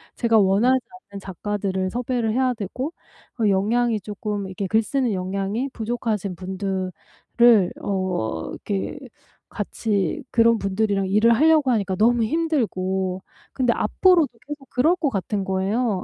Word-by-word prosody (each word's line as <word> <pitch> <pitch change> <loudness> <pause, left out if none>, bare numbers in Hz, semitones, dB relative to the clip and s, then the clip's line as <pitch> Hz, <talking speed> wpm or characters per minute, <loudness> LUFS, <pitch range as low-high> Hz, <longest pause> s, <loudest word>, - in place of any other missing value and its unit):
제가 230 -2 +2
원하지 215 +6 +4 0.3
않는 200 - -7
작가들을 190 0 -3
섭외를 240 0 -1
해야 255 +1 +2
되고 250 - -5 0.4
그 220 -3 +1
역량이 220 +4 +1
쪼끔 205 0 -4
이렇게 190 +1 -4
글 220 +4 +3
쓰는 255 +1 -1
역량이 195 +7 -2
부족하신 220 -4 -2
분들을 190 0 -3 0.9
어 180 - -2
이렇게 200 +6 -4 0.5
같이 205 +5 -2
그런 230 0 +4
분들이랑 195 0 0
일을 215 +4 +4
하려고 305 0 +4
하니까 200 -5 0
너무 230 +4 +3
힘들고 190 - -1 0.3
근데 250 -3 +2
앞으로도 355 -6 +3 0.2
계속 290 -2 -8
그럴 305 +8 +3
것 320 -5 0
같은 200 -2 -2
거예요. 190 +2 -1
210 Hz, 305 characters per minute, -23 LUFS, 190-245 Hz, 0.9 s, 원하지